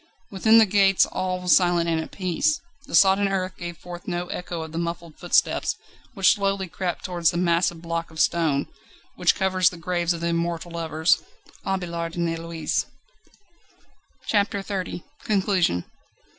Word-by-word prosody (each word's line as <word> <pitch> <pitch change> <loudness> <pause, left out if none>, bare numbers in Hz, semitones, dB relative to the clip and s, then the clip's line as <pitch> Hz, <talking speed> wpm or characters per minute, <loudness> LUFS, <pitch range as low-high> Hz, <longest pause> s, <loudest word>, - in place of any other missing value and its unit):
Within 220 +3 +5
the 225 - +7
gates 195 -1 +4
all 185 -1 -3
was 180 -1 +5
silent 175 -2 +3
and 165 -1 +1
at - - -7
peace. 185 - 0 0.3
The - - -3
sodden 195 +1 +5
earth 185 -1 -2
gave 175 -1 -7
forth 175 0 -10
no 175 -1 -2
echo 175 -2 -4
of 160 - -8
the 165 - -3
muffled 170 -1 -5
footsteps, 175 - +1 0.4
which 195 -2 +5
slowly 195 -2 -1
crept 180 0 -4
towards 175 -3 +1
the 170 - -2
massive 170 -1 +1
block 165 0 -3
of 160 0 -10
stone, 155 -5 +2 0.5
which - - +3
covers 185 -2 +2
the 180 - -11
graves 175 0 -1
of 165 - -6
the 170 - 0
immortal 170 0 -2
lovers 160 0 +1 0.5
Abélard 170 -3 -3
and 170 -1 0
Heloïse. 165 -1 -2 1.4
CHAPTER 205 -1 +1
XXX 190 -3 -4 0.2
Conclusion. 190 - +1
175 Hz, 155 wpm, -24 LUFS, 170-190 Hz, 1.4 s, the